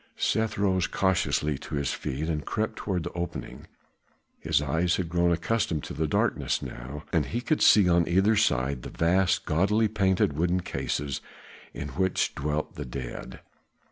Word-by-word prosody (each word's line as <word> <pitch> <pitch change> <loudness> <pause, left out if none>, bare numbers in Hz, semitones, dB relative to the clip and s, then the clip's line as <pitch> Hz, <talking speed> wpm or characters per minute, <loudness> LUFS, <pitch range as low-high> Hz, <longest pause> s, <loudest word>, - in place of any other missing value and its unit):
Seth 110 +1 0
rose 95 -2 +2
cautiously 75 -6 +1
to - - -6
his 70 -2 -1
feet 75 +5 -3
and 75 -2 -1
crept 110 0 -2
toward 90 -5 -2
the - - -6
opening; 85 0 -6 0.7
his - - +1
eyes 80 +5 +1
had 90 -3 -2
grown 85 0 +2
accustomed 85 -2 0
to - - -6
the 80 0 -1
darkness - - +1
now, 70 +5 -7
and 80 -4 +2
he 120 - -2
could 150 +5 0
see 100 -4 +7
on 85 -1 +3
either 95 +6 +3
side 70 - +1
the - - -7
vast 90 +3 +2
gaudily 105 +7 +2
painted 95 -7 +1
wooden 90 +4 +1
cases 70 -5 -3 0.5
in - - -6
which 95 0 0
dwelt 75 +2 -2
the 75 - -5
dead. 65 -1 -7
85 Hz, 165 wpm, -27 LUFS, 75-95 Hz, 0.7 s, see